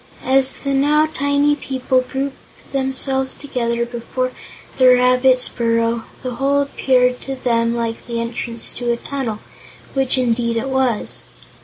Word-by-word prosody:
As 265 0 +4
the 275 -1 -2
now 295 +3 +3
tiny 285 -1 +1
people 260 -2 0
grouped 270 +1 -6
themselves 265 0 0
before 240 -1 -2 0.5
the 255 - +7
rabbit's 250 0 +4
burrow 230 -1 0 0.2
the 250 -2 -4
hole 280 +2 +2
appeared 250 -2 +1
to 270 - -4
them 230 -2 +1
like 230 -1 -3
the 235 -1 -3
entrance 230 0 -3
to 240 -1 -1
a 235 - 0
tunnel, 255 -5 -4 0.6
which 270 -1 +1
indeed 235 -2 +1
it 255 +4 -2
was. 260 -4 0
255 Hz, 135 wpm, -19 LUFS, 235-270 Hz, 0.6 s, the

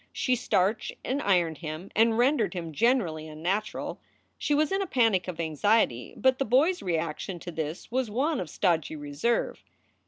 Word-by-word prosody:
She 255 - +1
starched 215 -3 0
and 275 +3 -1
ironed 175 - +2
him 160 +3 -6
and 225 +1 +4
rendered 240 -6 +2
him 165 -3 -5
generally 180 - +1
unnatural. 175 +8 -3 0.4
She 295 - +1
was 305 +3 +2
in 390 +1 +1
a 390 - -2
panic 225 - +2
of 180 -3 -5
anxiety, 160 - +1
but 260 0 +3
the - - +2
boy 260 +9 +4
s 360 - -8
reaction 170 +1 -2
to 175 +1 -7
this 160 +4 -5
was 255 -1 0
one 280 +9 0
of 175 - -4
stodgy 165 -2 0
reserve. 145 +11 -1
195 Hz, 175 wpm, -28 LUFS, 160-250 Hz, 0.4 s, and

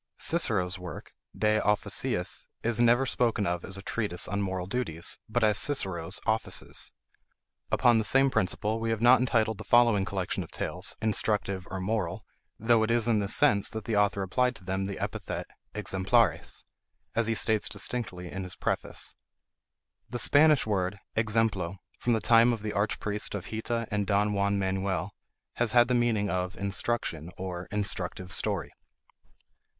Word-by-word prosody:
Cicero's 95 - +1
work 90 -3 -8 0.2
De 110 0 +2
Officiis 105 0 0 0.2
is 120 0 +1
never 120 +2 +4
spoken 115 -5 0
of 85 -1 -1
as 95 0 -3
a 100 - -9
treatise 100 -6 -2
on 100 +1 -2
Moral 95 -2 -2
Duties, 90 -6 -1
but 110 +1 0
as 105 -2 +3
Cicero's 95 - -1
Offices. 110 0 -2 0.8
Upon 120 -3 +4
the - - 0
same 135 +5 +4
principle 105 +3 0
we 115 0 -2
have 115 0 -1
not 125 +2 +7
entitled 110 -4 +1
the - - -6
following 120 -5 +4
collection 95 -2 -2
of - - -8
tales, - - -3
Instructive 100 -4 0
or 95 - -4
Moral; 95 -1 -2 0.3
though 115 0 +3
it 110 - +1
is 115 -1 +2
in 115 -3 +3
this 100 +1 +1
sense 105 -9 +4
that 110 -2 -6
the 115 - -1
author 100 -1 +2
applied 125 +7 +1
to - - -14
them 95 +1 -2
the 100 0 -4
epithet - - -4 0.3
exemplares, 95 -2 +1 0.5
as 115 -1 +1
he 115 - +1
states 110 -1 +1
distinctly 95 -8 -3
in 95 - -4
his 90 -1 -7
preface. - - -2 0.9
The 120 - -3
Spanish 150 +3 +5
word 100 -2 -1 0.2
exemplo, 110 -5 0 0.2
from 120 - +1
the 110 - +1
time 115 +2 +5
of 110 -2 -5
the 105 - -3
archpriest 105 0 -1
of 95 -3 -6
Hita 115 +1 -2
and 105 -1 -1
Don 105 0 +2
Juan 100 0 +1
Manuel, 95 0 -1 0.4
has 120 -2 +1
had 120 0 +6
the - - +2
meaning 120 -4 +2
of 90 0 -2
instruction, 100 -4 -2
or 90 -1 -5
instructive 95 -3 -3
story. 95 -4 0
105 Hz, 165 wpm, -28 LUFS, 95-115 Hz, 0.9 s, not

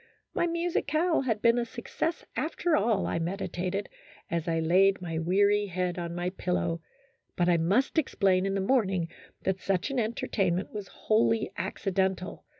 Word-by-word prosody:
My 345 - +1
musicale 335 -1 +1
had 225 -5 -1
been 235 +1 +5
a - - +1
success 240 +8 -3
after 325 +1 0
all, 210 -1 +2
I - - -1
meditated, 185 +2 -2 0.4
as 170 -1 -1
I 165 -1 +1
laid 185 +4 +4
my 165 -3 -3
weary 205 +4 +3
head 180 -1 -2
on 170 0 -4
my 175 +1 -2
pillow, 175 -2 -1 0.5
but 175 - +2
I 175 -1 +4
must 200 - +2
explain 195 -9 +2
in 195 - -1
the 195 - 0
morning 190 -7 +1 0.3
that 190 0 -1
such 195 +7 0
an 270 - 0
entertainment 195 -5 -1
was 205 -2 -5
wholly 220 0 +1
accidental. 190 0 -2
195 Hz, 155 wpm, -29 LUFS, 180-230 Hz, 0.5 s, been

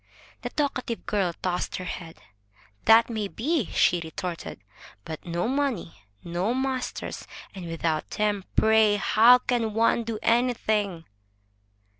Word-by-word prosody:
The - - -4
talkative 255 -5 -2
girl 195 -4 0
tossed 180 -1 -1
her 185 - -4
head. 170 -2 -7 0.7
"That 225 +1 +7
may 220 -3 -3
be!" 275 - -1
she 175 -1 +2
retorted. 170 +1 -6 0.5
But 160 +1 -7
no 170 +4 -1
money, 265 -10 -1 0.3
no 180 +7 -1
masters, 260 -1 -3 0.3
and 185 -3 -7
without 165 -1 -2
them, 210 -2 -1
pray, 220 -1 +5
how 225 +4 +6
can 235 -4 -1
one 230 +1 +3
do 225 -1 -4
anything?" 215 -7 +1
215 Hz, 125 wpm, -26 LUFS, 180-235 Hz, 0.7 s, That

